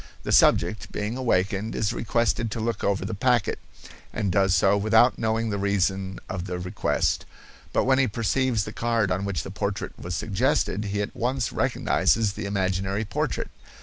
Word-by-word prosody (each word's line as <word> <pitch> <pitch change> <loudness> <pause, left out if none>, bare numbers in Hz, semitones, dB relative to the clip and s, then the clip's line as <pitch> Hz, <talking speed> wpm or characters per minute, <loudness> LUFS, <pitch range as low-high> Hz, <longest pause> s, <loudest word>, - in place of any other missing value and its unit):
The - - -3
subject, 110 - +3
being 105 +3 -3
awakened, 105 -3 0
is 105 -2 0
requested 115 0 0
to 110 - -4
look 115 -1 -2
over 100 -1 0
the 110 - -4
packet, 120 +1 +1 0.5
and 100 - -1
does 95 +1 +3
so 100 +1 +4
without 110 +4 +4
knowing 110 0 0
the 100 - -2
reason 95 -1 0
of 90 -1 -4
the 90 -1 -4
request, 90 0 -1 0.5
but - - +2
when 130 0 +3
he 135 - +3
perceives 115 +1 0
the 105 - -7
card 115 -5 0
on 95 +2 -1
which 95 -10 -2
the - - -7
portrait - - -3
was 90 +2 -4
suggested, 105 0 0
he 100 0 -1
at 100 - -7
once 125 0 -1
recognizes 110 -3 +1
the 105 -1 -5
imaginary 95 +1 -1
portrait. 100 - -2
105 Hz, 175 wpm, -25 LUFS, 95-115 Hz, 0.5 s, so